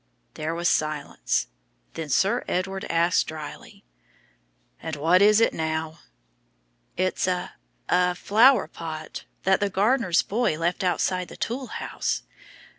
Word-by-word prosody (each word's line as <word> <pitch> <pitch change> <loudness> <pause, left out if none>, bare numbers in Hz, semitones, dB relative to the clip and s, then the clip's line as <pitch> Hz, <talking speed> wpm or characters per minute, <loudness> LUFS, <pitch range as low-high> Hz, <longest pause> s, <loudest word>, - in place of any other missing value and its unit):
There 155 +2 -3
was 170 0 0
silence. 155 -3 0 0.5
Then 160 -2 -5
Sir 195 +7 +2
Edward 190 +1 -2
asked 170 +2 +2
drily, 155 -2 -9 1.0
"And 160 -1 -4
what 165 +6 +3
is 210 +1 +6
it 230 - +3
now?" 160 0 -3 1.0
"It's 185 +1 0
a 180 -1 -2 0.3
a 180 0 +2
flower 220 - +4
pot, 160 -1 -7 0.2
that 190 0 +3
the 205 - 0
gardener's 200 -2 +2
boy 215 -6 0
left 170 +3 -1
outside 180 0 0
the - - -12
tool 255 +3 -3
house. - - -3
180 Hz, 125 wpm, -25 LUFS, 160-195 Hz, 1.0 s, is